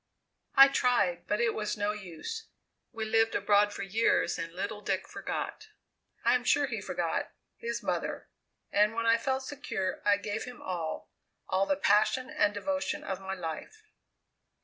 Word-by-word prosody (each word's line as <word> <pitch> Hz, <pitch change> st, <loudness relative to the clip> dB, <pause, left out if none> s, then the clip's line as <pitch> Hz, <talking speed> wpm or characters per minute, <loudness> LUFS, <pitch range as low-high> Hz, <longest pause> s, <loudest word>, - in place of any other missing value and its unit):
"I 275 Hz, 0 st, +10 dB
tried, 245 Hz, -10 st, +1 dB
but 210 Hz, -, 0 dB
it 235 Hz, -1 st, +2 dB
was 210 Hz, -1 st, -2 dB
no 205 Hz, 0 st, +1 dB
use. 210 Hz, -, -6 dB, 0.4 s
We 225 Hz, -2 st, -4 dB
lived 225 Hz, +1 st, +2 dB
abroad 205 Hz, +1 st, +4 dB
for 200 Hz, -, -5 dB
years, 195 Hz, -3 st, +2 dB
and 165 Hz, 0 st, -4 dB
little 200 Hz, +4 st, -4 dB
Dick 190 Hz, -2 st, -1 dB
forgot 440 Hz, -, -5 dB, 0.6 s
I -, -, +5 dB
am -, -, +2 dB
sure -, -, +3 dB
he -, -, -4 dB
forgot -, -, -2 dB, 0.2 s
his 235 Hz, 0 st, -4 dB
mother, -, -, -2 dB, 0.4 s
and 210 Hz, +2 st, +3 dB
when 230 Hz, 0 st, -1 dB
I 230 Hz, 0 st, +5 dB
felt 265 Hz, +2 st, -1 dB
secure 195 Hz, -9 st, -3 dB
I 205 Hz, -1 st, +4 dB
gave 205 Hz, +1 st, -4 dB
him 250 Hz, -1 st, -9 dB
all, 170 Hz, -4 st, -4 dB, 0.4 s
all 190 Hz, +1 st, +1 dB
the 290 Hz, -, +2 dB
passion 255 Hz, +2 st, +3 dB
and 205 Hz, -1 st, +3 dB
devotion 285 Hz, +7 st, -2 dB
of 195 Hz, -5 st, -4 dB
my 190 Hz, 0 st, -4 dB
life. 180 Hz, -, -6 dB
210 Hz, 165 wpm, -30 LUFS, 195-245 Hz, 0.6 s, I